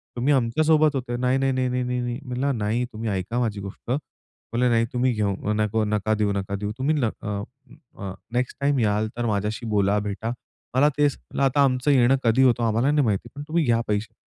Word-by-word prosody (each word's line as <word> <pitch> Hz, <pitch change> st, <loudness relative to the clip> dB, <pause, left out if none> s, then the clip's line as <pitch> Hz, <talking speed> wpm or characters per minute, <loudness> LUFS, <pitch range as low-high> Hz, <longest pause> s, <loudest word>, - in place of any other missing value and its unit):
तुम्ही 130 Hz, +4 st, +2 dB
आमच्यासोबत 150 Hz, +4 st, +3 dB
होते." 125 Hz, -2 st, -3 dB
"नाही, 125 Hz, +1 st, +1 dB
नाही, 135 Hz, 0 st, +1 dB
नाही, 130 Hz, 0 st, 0 dB
नाही, 125 Hz, 0 st, -1 dB
नाही, 125 Hz, 0 st, -2 dB
नाही." 120 Hz, 0 st, -3 dB
म्हणलं 125 Hz, +1 st, -1 dB
"नाही, 110 Hz, +3 st, 0 dB
तुम्ही 110 Hz, +1 st, -3 dB
ऐका 100 Hz, +5 st, -2 dB
माझी 110 Hz, -4 st, -1 dB
गोष्ट." 100 Hz, +4 st, -7 dB
म्हणे, 125 Hz, -3 st, -3 dB
"नाही, 115 Hz, -1 st, +3 dB
तुम्ही 125 Hz, +1 st, +2 dB
घेऊ 105 Hz, -1 st, -1 dB
नको, 110 Hz, +1 st, +1 dB
नका 105 Hz, 0 st, 0 dB
देऊ 105 Hz, -1 st, +1 dB
नका. 100 Hz, 0 st, -3 dB
देऊ, 105 Hz, +1 st, -3 dB
तुम्ही 140 Hz, +4 st, +1 dB
न 125 Hz, -7 st, +1 dB
अ, 100 Hz, -1 st, -3 dB, 0.6 s
अ, 95 Hz, -, -4 dB, 0.2 s
नेक्स्ट 125 Hz, +1 st, -1 dB
टाईम 140 Hz, -1 st, +2 dB
याल, 105 Hz, -1 st, +1 dB
तर 120 Hz, -, -1 dB
माझ्याशी 105 Hz, +1 st, -1 dB
बोला, 105 Hz, -1 st, +2 dB
भेटा. 105 Hz, +2 st, -3 dB, 0.4 s
मला 145 Hz, +3 st, +5 dB
तेच" 145 Hz, -1 st, +3 dB
म्हणलं, -, -, -4 dB
"आता 135 Hz, +1 st, +3 dB
आमचं 130 Hz, +1 st, +2 dB
येणं 130 Hz, -1 st, +5 dB
कधी 120 Hz, +3 st, +4 dB
होतं, 120 Hz, -2 st, +3 dB
आम्हाला 115 Hz, +5 st, +2 dB
नाही 150 Hz, -2 st, +3 dB
माहिती. 110 Hz, +2 st, -1 dB
पण 145 Hz, -, -6 dB
तुम्ही 165 Hz, +1 st, +1 dB
घ्या 115 Hz, -2 st, +3 dB
पैसे." 105 Hz, 0 st, -2 dB
120 Hz, 210 wpm, -24 LUFS, 105-130 Hz, 0.6 s, मला